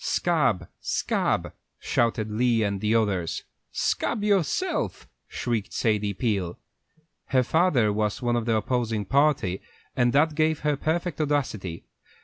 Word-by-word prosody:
"Scab! 125 - +1
scab!" - - -1 0.2
shouted 115 -2 0
Lee 115 0 +2
and 100 -2 -1
the 110 +1 +2
others. 100 -7 0 0.3
"Scab 215 -3 -1
yourself!" 205 - 0 0.2
shrieked 115 -5 -3
Sadie 105 -3 0
Peel. 95 -7 -1 0.7
Her 130 -1 +2
father 130 - +2
was 105 +1 -1
one 120 -2 0
of 120 -2 -1
the 115 -1 +2
opposing 110 -1 -1
party, 135 -7 +2 0.3
and 120 0 +3
that 150 +4 +3
gave 155 0 +1
her 150 -1 +1
perfect 160 +2 -1
audacity. 120 - -2
120 Hz, 130 wpm, -26 LUFS, 105-150 Hz, 0.7 s, and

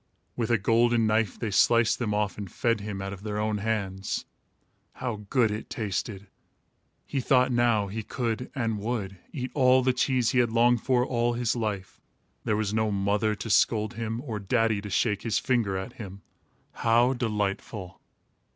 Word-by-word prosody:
With 115 -2 -2
a 120 - +4
golden 115 +3 +3
knife, 110 -1 +1
they 110 -3 -3
sliced 115 +3 +4
them 115 -4 -1
off 105 -1 0
and 100 -4 -7
fed 115 -3 0
him 100 -2 -5
out 95 0 -4
of 95 - -10
their 105 0 -4
own 105 0 -1
hands. 100 -3 -2 0.7
How 110 -5 -5
good 120 -5 +3
it 105 +1 -5
tasted! 100 -2 -3 0.8
He 140 - -2
thought 130 0 +3
now 120 -4 +2
he 105 +3 -4
could, 115 +2 -3
and 115 -5 -1
would, 100 -4 -3
eat 130 -3 -4
all 130 -1 +4
the 130 0 +3
cheese 125 -2 +1
he 125 - +2
had 120 -2 +2
longed 120 0 +3
for 125 -2 +2
all 120 -1 0
his 120 0 0
life. 105 -6 -4 0.4
There 105 - +1
was 105 -1 -1
no 110 0 +1
mother 105 +2 +1
to 115 - -6
scold 110 +1 +3
him, 115 0 -4
or 115 -6 -5
daddy 110 +1 +1
to 105 - -7
shake 105 +1 +1
his 115 -2 0
finger 115 -7 0
at 95 - -6
him. 100 -3 -9 0.5
How 120 +3 +3
delightful! 105 -4 -3
110 Hz, 180 wpm, -27 LUFS, 105-120 Hz, 0.8 s, a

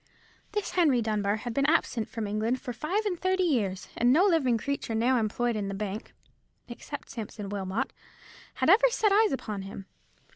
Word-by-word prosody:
This 420 -1 -2
Henry 305 -9 +3
Dunbar 210 -2 0
had 235 +2 -5
been 275 +3 +2
absent 250 -8 +1
from 225 -3 -4
England 215 +5 -1
for 245 -2 -6
five 360 - -1
and 360 -5 -1
thirty 375 0 +1
years, 210 - 0
and 240 +1 +3
no 335 +8 +5
living 295 - +3
creature 255 -2 -3
now 245 +3 +3
employed 230 +2 0
in 205 -2 -2
the 195 - -4
bank, 205 +1 -5 0.6
except 275 +4 -8
Sampson 210 -3 -6
Wilmot, 195 +1 -2 0.6
had - - 0
ever - - +6
set 440 -3 +2
eyes 425 0 +4
upon 215 -7 -3
him. 195 0 -8
240 Hz, 180 wpm, -28 LUFS, 210-320 Hz, 0.6 s, ever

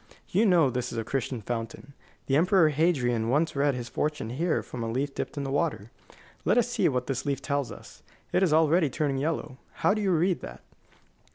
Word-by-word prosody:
You 215 +5 +3
know 165 -8 +4
this 125 0 -3
is - - -5
a 115 - -1
Castalian 125 -1 -3
fountain. 115 +5 -5 0.3
The 135 - +1
Emperor 175 +1 +4
Hadrian 130 -8 +1
once 150 +5 +1
read 140 -1 +2
his 120 -1 -5
fortune 150 -4 -2
here 160 +6 0
from 125 - -7
a 115 - -3
leaf 135 +4 -2
dipped - - -5
in 140 - -2
the 135 - -3
water. 140 - -1 0.5
Let - - +2
us - - +3
see - - +1
what 125 -1 -1
this 135 -1 -2
leaf 140 -2 -1
tells 140 -2 -2
us. - - -12 0.3
It - - +3
is 185 -5 +3
already 160 0 +4
turning 140 -1 -1
yellow. 140 -3 -3 0.3
How - - +5
do 215 - -2
you 200 - +1
read 175 +1 +2
that?" - - -9
140 Hz, 210 wpm, -27 LUFS, 125-165 Hz, 0.5 s, How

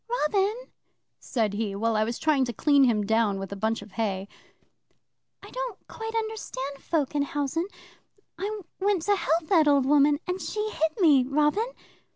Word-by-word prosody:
'"Robin," 405 -1 +1 0.6
said 220 -5 -1
he, 205 -1 -2
while 225 +2 0
I 215 - +3
was 235 +2 -3
trying 305 -4 +2
to 240 - -4
clean 285 +2 +4
him 215 -4 +2
down 220 -2 +2
with 195 0 -6
a - - -4
bunch 220 +1 -1
of 205 - -15
hay, 195 -3 -2 1.2
"I - - -11
don't - - -6
quite 450 0 -6
understand 420 -12 -4
folk 305 -5 -1
in 290 - +1
housen. 290 +4 -1 0.7
I 410 +4 -4 0.2
went 390 -3 +1
to 410 +2 +3
help 330 -3 0
that 325 -6 +5
old 280 -2 +4
woman, 290 +1 +4
and 360 +1 -3
she 430 0 -3
hit 320 +1 -1
me, 295 -8 +6
Robin!" 300 - +2
290 Hz, 175 wpm, -26 LUFS, 230-380 Hz, 1.2 s, me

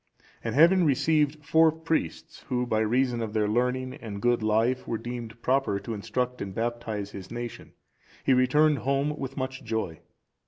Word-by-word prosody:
(405) - - -23
And - - -2 0.2
having 190 -1 +3
received 150 +1 +1
four 160 +1 +5
priests, 160 - -3
who 125 0 0
by 110 -3 0
reason 120 +2 +1
of 110 -2 -4
their 105 -1 +1
learning 125 +3 0
and 105 -3 -7
good 120 +1 +2
life 115 +4 +1
were 115 - -1
deemed 120 -1 -7
proper 130 -6 +1
to 105 +3 -5
instruct 125 +4 -3
and 95 -1 -5
baptize 115 -3 -3
his 95 -2 -9
nation, 120 0 -7 0.5
he 135 - +4
returned 145 +3 +4
home 140 +4 0
with 135 +1 -5
much 130 -1 -4
joy. 110 -8 -3
125 Hz, 170 wpm, -27 LUFS, 110-135 Hz, 0.5 s, four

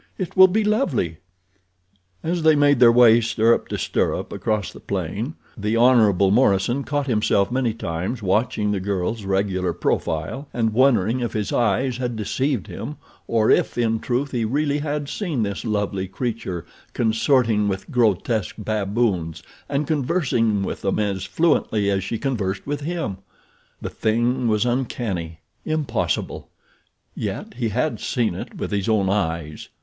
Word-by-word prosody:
"It 185 -3 -4
will 190 0 +9
be 215 +4 +1
lovely." 180 - 0 1.1
As 170 +1 -1
they 160 -1 +5
made 145 -2 +4
their 120 -2 +8
way 120 -1 +6
stirrup 115 0 +2
to - - -3
stirrup - - -1
across 105 -3 -2
the - - -11
plain 100 - -4 0.2
the 105 +1 -1
Hon. 120 -3 +6 0.2
Morison 120 +2 +2
caught 145 0 -1
himself 105 -4 +1
many 125 -2 +1
times 95 +4 -4
watching 105 +1 +1
the 100 - 0
girl's 100 +2 -2
regular 95 -2 0
profile 85 - -2
and 115 -2 +1
wondering 120 -2 +3
if 120 -2 -3
his 105 -2 -2
eyes 120 +3 +1
had 125 -2 -3
deceived 125 +2 -1
him - - -7 0.3
or 110 -2 +2
if, - - +2
in 115 -2 +1
truth, 130 +4 -2
he 120 -3 -1
really 145 +5 0
had 145 -1 -3
seen 155 - -2
this 100 -1 -3
lovely 100 -3 -1
creature 110 -5 -4 0.3
consorting 110 -2 +2
with 95 -1 -4
grotesque 110 -2 +1
baboons 100 -6 -1 0.3
and 145 +1 0
conversing 130 - +1
with - - -4
them 95 - 0
as 100 -3 -1
fluently 105 - +1
as 95 -1 0
she 115 - -3
conversed 105 -8 -2
with 145 +1 -3
him. 155 - -3 0.6
The - - -5
thing 120 +3 0
was 110 +1 +2
uncanny—impossible; 120 - -3 0.6
yet - - -5
he 120 -1 -2
had 155 +9 -1
seen 120 -8 0
it - - -8
with - - -4
his 100 0 -1
own 105 -3 +2
eyes. 80 -6 -2
115 Hz, 150 wpm, -22 LUFS, 100-130 Hz, 1.1 s, will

